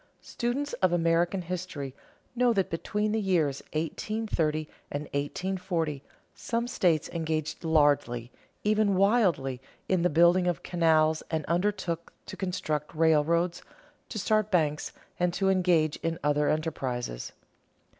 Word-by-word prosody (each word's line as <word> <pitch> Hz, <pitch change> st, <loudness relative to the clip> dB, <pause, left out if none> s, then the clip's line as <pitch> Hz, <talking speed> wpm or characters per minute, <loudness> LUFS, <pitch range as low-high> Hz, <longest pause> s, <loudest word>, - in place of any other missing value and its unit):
Students 255 Hz, +5 st, -2 dB
of 185 Hz, -2 st, +4 dB
American 175 Hz, +2 st, +2 dB
history 170 Hz, -6 st, -5 dB, 0.4 s
know 245 Hz, -1 st, +3 dB
that 195 Hz, -3 st, 0 dB
between 210 Hz, +5 st, -1 dB
the 220 Hz, 0 st, 0 dB
years 165 Hz, -8 st, +1 dB
1830 160 Hz, -1 st, -1 dB, 0.2 s
and 145 Hz, +1 st, -3 dB
1840 165 Hz, +1 st, -2 dB, 0.3 s
some 235 Hz, 0 st, -2 dB
states 170 Hz, -, +1 dB
engaged 160 Hz, -2 st, -3 dB
largely, 145 Hz, -7 st, +2 dB, 0.3 s
even 210 Hz, -1 st, +2 dB
wildly, 185 Hz, -, +2 dB, 0.3 s
in 185 Hz, -2 st, +2 dB
the 180 Hz, -, +3 dB
building 175 Hz, +3 st, +4 dB
of 175 Hz, -5 st, -1 dB
canals 160 Hz, -2 st, +3 dB
and 160 Hz, -2 st, -2 dB
undertook 175 Hz, -1 st, -1 dB
to -, -, -8 dB
construct 155 Hz, -5 st, -3 dB
railroads, 165 Hz, +2 st, +2 dB, 0.5 s
to 220 Hz, -, -5 dB
start 215 Hz, +1 st, +1 dB
banks, 155 Hz, -6 st, +1 dB, 0.3 s
and 180 Hz, 0 st, +2 dB
to 195 Hz, -1 st, +2 dB
engage 175 Hz, -5 st, +2 dB
in 165 Hz, 0 st, -2 dB
other 150 Hz, 0 st, +2 dB
enterprises. 130 Hz, -, -3 dB
170 Hz, 125 wpm, -28 LUFS, 155-190 Hz, 0.5 s, of